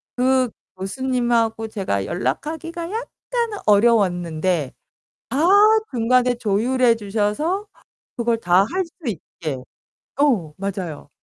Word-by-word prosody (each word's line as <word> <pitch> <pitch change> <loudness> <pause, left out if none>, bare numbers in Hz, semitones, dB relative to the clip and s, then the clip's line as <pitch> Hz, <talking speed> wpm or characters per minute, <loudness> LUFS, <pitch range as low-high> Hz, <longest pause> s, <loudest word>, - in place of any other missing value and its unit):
그 255 0 +2 0.3
교수님하고 235 +1 0
제가 185 - -2
연락하기가 320 - -3
약간 465 -1 -3
어려웠는데 180 - +2 0.6
다 270 - -2 0.5
중간에 250 0 +2
조율해 235 +3 +2
주셔서 225 - -1 0.5
그걸 235 -1 +1
다 180 -1 +4
할 375 0 0
수 330 - -18 0.2
있게 160 -6 -5 0.6
어 220 - +2
맞아요. 185 -7 -5
230 Hz, 220 characters per minute, -21 LUFS, 190-260 Hz, 0.6 s, 다